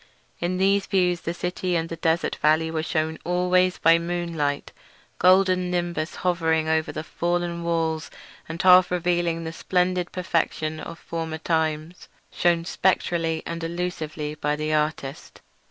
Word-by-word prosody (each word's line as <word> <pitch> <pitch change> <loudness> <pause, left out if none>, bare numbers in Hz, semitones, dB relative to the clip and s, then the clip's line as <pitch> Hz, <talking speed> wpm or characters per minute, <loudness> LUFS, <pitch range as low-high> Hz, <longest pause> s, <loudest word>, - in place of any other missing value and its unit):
In 180 +1 -1
these 195 +1 +2
views 180 -3 +1
the 170 - -3
city 180 0 -2
and 165 -1 0
the 165 - -5
desert 165 +1 0
valley 160 +1 +2
were 160 -1 -1
shewn 160 0 -2
always 180 +1 +2
by 165 0 +5
moonlight, 170 -4 -2
a - - -28 0.4
golden 185 0 +4
nimbus 175 -2 -2
hovering 160 -3 +1
over 160 0 +1
the 155 - -5
fallen 175 +1 -2
walls 165 -2 -1 0.4
and 165 +1 -5
half 185 0 +7
revealing 175 -1 0
the 160 0 -5
splendid 180 0 0
perfection 160 -3 -1
of 165 +1 -8
former 165 -2 -5
times, 160 +1 -2 0.2
shewn 170 -1 +1
spectrally 170 -3 0
and 170 0 -5
elusively 165 -3 -4
by 150 -1 -1
the 155 +1 -2
artist. 150 -2 -2
170 Hz, 145 wpm, -24 LUFS, 160-180 Hz, 0.4 s, half